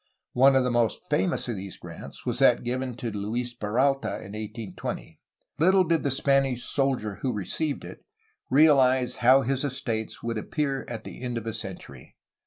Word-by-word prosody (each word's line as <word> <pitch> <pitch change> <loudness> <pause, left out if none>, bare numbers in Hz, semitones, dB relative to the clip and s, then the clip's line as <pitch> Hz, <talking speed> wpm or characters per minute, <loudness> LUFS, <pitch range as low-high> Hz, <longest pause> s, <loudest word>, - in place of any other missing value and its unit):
One 135 +2 +6
of 130 - +4
the 125 - 0
most 120 -2 +1
famous 170 +2 +1
of 120 - -2
these 95 0 -7
grants - - -10
was - - -1
that - - +5
given 125 0 -2
to 115 -1 -4
Luis 115 +4 -3
Peralta 125 +5 0
in 100 - -10
1820. 105 -6 -6 0.4
Little 185 +4 +5
did 165 -2 +1
the 140 - 0
Spanish 135 -2 +2
soldier 130 -7 0
who 130 - 0
received 140 - -2
it - - -11 0.5
realize 130 -3 +4
how 130 +2 +5
his 135 +2 -1
estates 130 -5 -3
would 115 -1 -2
appear 140 +2 -2
at 115 -2 -6
the - - -9
end 125 -2 -3
of 115 - -5
a 115 - -3
century. 90 - -8
125 Hz, 175 wpm, -26 LUFS, 110-135 Hz, 0.5 s, One